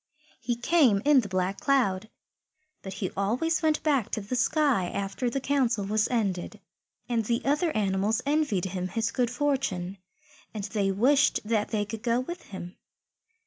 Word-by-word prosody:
He 240 Hz, 0 st, -2 dB
came 240 Hz, -5 st, +3 dB
in 295 Hz, -2 st, +6 dB
the 210 Hz, -, -6 dB
Black 185 Hz, +1 st, -1 dB
Cloud, 220 Hz, -8 st, +1 dB, 0.7 s
but 190 Hz, -, -7 dB
he 190 Hz, -1 st, -3 dB
always 245 Hz, +13 st, 0 dB
went 310 Hz, -1 st, +1 dB
back 280 Hz, -8 st, +1 dB
to 215 Hz, -, -1 dB
the 205 Hz, +6 st, -4 dB
sky 265 Hz, -, +2 dB
after 200 Hz, +5 st, -2 dB
the 275 Hz, -, -2 dB
Council 255 Hz, -6 st, +1 dB
was 215 Hz, +2 st, +1 dB
ended. 200 Hz, -7 st, -2 dB, 0.5 s
And 235 Hz, -2 st, 0 dB
the 235 Hz, +2 st, -1 dB
other 295 Hz, +5 st, +2 dB
animals 200 Hz, +1 st, +1 dB
envied 285 Hz, -, +1 dB
him 185 Hz, -1 st, -3 dB
his 225 Hz, +4 st, -1 dB
good 245 Hz, -1 st, 0 dB
fortune, 245 Hz, -9 st, -1 dB, 0.6 s
and 210 Hz, -, -4 dB
they 200 Hz, -1 st, -1 dB
wished 265 Hz, +9 st, +3 dB
that 215 Hz, -1 st, 0 dB
they 210 Hz, -2 st, -1 dB
could 215 Hz, +1 st, -7 dB
go 235 Hz, 0 st, +1 dB
with 345 Hz, +8 st, -5 dB
him. 185 Hz, -2 st, -9 dB
225 Hz, 165 wpm, -27 LUFS, 195-270 Hz, 0.7 s, in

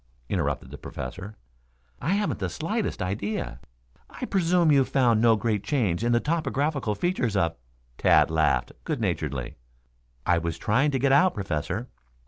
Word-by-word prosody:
interrupted -, -, -2 dB
the -, -, -9 dB
Professor. 90 Hz, -, -7 dB, 0.6 s
"I 165 Hz, -, +1 dB
haven't 205 Hz, 0 st, -1 dB
the -, -, -2 dB
slightest 200 Hz, -, -2 dB
idea." 100 Hz, +3 st, -3 dB, 0.5 s
"I -, -, -6 dB
presume 175 Hz, -3 st, +3 dB
you 140 Hz, -2 st, +5 dB
found 120 Hz, -5 st, +2 dB
no 115 Hz, -1 st, +5 dB
great 105 Hz, -1 st, -1 dB
change 110 Hz, -, 0 dB
in 120 Hz, -, +2 dB
the 120 Hz, -, +4 dB
topographic 150 Hz, -1 st, -1 dB
features 155 Hz, -, 0 dB
of 85 Hz, -4 st, +1 dB, 0.2 s
" -, -, -37 dB
Tad -, -, +4 dB
laughed 80 Hz, -1 st, +2 dB
good 155 Hz, -5 st, -2 dB
naturedly. 75 Hz, -, -2 dB, 0.7 s
"I 85 Hz, -, +3 dB
was 85 Hz, 0 st, -3 dB
trying 130 Hz, -, +2 dB
to 135 Hz, -, 0 dB
get 135 Hz, +1 st, +2 dB
out, 160 Hz, +6 st, +5 dB
Professor. 95 Hz, +4 st, -3 dB
115 Hz, 155 wpm, -26 LUFS, 90-150 Hz, 0.7 s, you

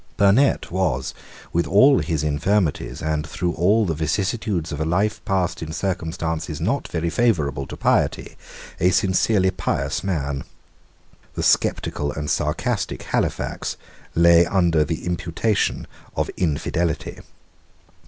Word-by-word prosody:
Burnet 110 Hz, +5 st, +3 dB
was, 80 Hz, -9 st, -1 dB, 0.4 s
with 85 Hz, -, +1 dB
all 130 Hz, +8 st, +6 dB
his 80 Hz, -4 st, -1 dB
infirmities, 75 Hz, -5 st, 0 dB
and 80 Hz, -1 st, 0 dB
through 90 Hz, 0 st, -2 dB
all 100 Hz, +7 st, +3 dB
the 85 Hz, -, 0 dB
vicissitudes 95 Hz, +2 st, -1 dB
of 75 Hz, -, -4 dB
a -, -, +2 dB
life 105 Hz, +7 st, 0 dB
passed 95 Hz, -3 st, 0 dB
in 80 Hz, -1 st, -5 dB
circumstances 80 Hz, -3 st, -3 dB
not -, -, -1 dB
very 85 Hz, +1 st, -2 dB
favourable 75 Hz, -, +1 dB
to -, -, -8 dB
piety, -, -, 0 dB, 0.4 s
a 90 Hz, -, +4 dB
sincerely 95 Hz, +1 st, +2 dB
pious -, -, -2 dB
man. 75 Hz, -7 st, -2 dB, 0.9 s
The -, -, -2 dB
sceptical 75 Hz, 0 st, +1 dB
and 75 Hz, -1 st, -3 dB
sarcastic 95 Hz, -, -1 dB
Halifax -, -, -2 dB, 0.4 s
lay 85 Hz, 0 st, +6 dB
under 85 Hz, -3 st, +2 dB
the 80 Hz, +2 st, -4 dB
imputation 90 Hz, +4 st, -1 dB, 0.3 s
of -, -, -1 dB
infidelity. 80 Hz, 0 st, -1 dB
85 Hz, 125 wpm, -22 LUFS, 75-95 Hz, 0.9 s, all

